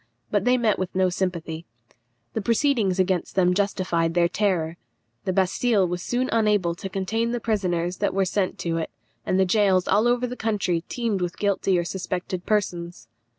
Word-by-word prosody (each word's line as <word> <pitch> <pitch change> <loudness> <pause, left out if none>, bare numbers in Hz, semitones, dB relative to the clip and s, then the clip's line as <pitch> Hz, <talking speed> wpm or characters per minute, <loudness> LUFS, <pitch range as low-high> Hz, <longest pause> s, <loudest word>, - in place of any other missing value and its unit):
But 205 +1 +1
they 250 0 +4
met 225 -4 +1
with 185 -1 -3
no 185 0 +3
sympathy. 170 -3 -3 0.7
The 220 - -1
proceedings 230 -4 +2
against 185 -2 0
them 180 -1 +4
justified 180 -4 0
their 175 -1 +4
terror. 170 -4 0 0.5
The 185 - +1
Bastille 195 +2 +2
was 175 0 -3
soon 245 +7 -1
unable 210 -6 +2
to 190 +3 -7
contain 220 +5 -1
the 240 - -1
prisoners 180 -6 -1
that - - -1
were 195 -1 +2
sent 185 0 -1
to 165 -1 -1
it, 160 - -2 0.4
and 185 - +2
the 190 - +5
gaols 190 -1 +3
all 210 +4 +3
over 245 +1 +2
the 250 0 -5
country 205 -7 0
teemed 230 -6 -1
with 175 -1 -3
guilty 195 -2 +1
or 175 - +1
suspected 180 0 -4
persons. 175 - -2
190 Hz, 180 wpm, -24 LUFS, 175-210 Hz, 0.7 s, the